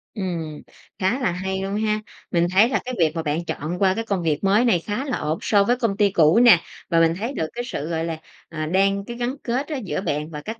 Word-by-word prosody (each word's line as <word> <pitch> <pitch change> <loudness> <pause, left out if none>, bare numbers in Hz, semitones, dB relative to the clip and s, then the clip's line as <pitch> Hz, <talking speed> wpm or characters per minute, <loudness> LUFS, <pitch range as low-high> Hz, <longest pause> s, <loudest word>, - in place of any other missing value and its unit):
Ừm, 170 -7 -4 0.4
khá 200 +7 +1
là 240 -9 +1
hay 190 +2 -3
luôn 195 +1 -3
ha! 215 0 0 0.3
Mình 170 0 +2
thấy 205 +5 +5
là 265 - +1
cái 255 0 -4
việc 160 -3 +3
mà 165 - -2
bạn 155 +2 -2
chọn 170 +4 -4
qua 190 -1 +3
cái 225 - -2
công 200 -5 -1
việc 155 0 0
mới 205 +5 +4
này 195 -8 +3
khá 210 +10 -4
là 265 - -2
ổn 155 +2 -2
so 205 -2 +3
với 240 +5 +2
công 225 -5 -1
ty 205 -1 +3
cũ 165 +2 +5
nè. 235 -8 +7 0.3
Và 165 -1 +3
mình 165 0 +4
thấy 235 +6 -3
được 160 - -2
cái 240 - -4
sự, 155 - -4
gọi 165 -1 -1
là, 165 -1 -3 0.3
à, 155 -2 -4
đang 195 +4 +1
cái 235 +2 -7
gắn 245 +2 -2
kết 255 +4 -1
á 310 - -4
giữa 200 -6 -3
bạn 150 -4 -2
và 150 -2 -7
các 220 +7 -7
195 Hz, 265 wpm, -23 LUFS, 165-225 Hz, 0.4 s, nè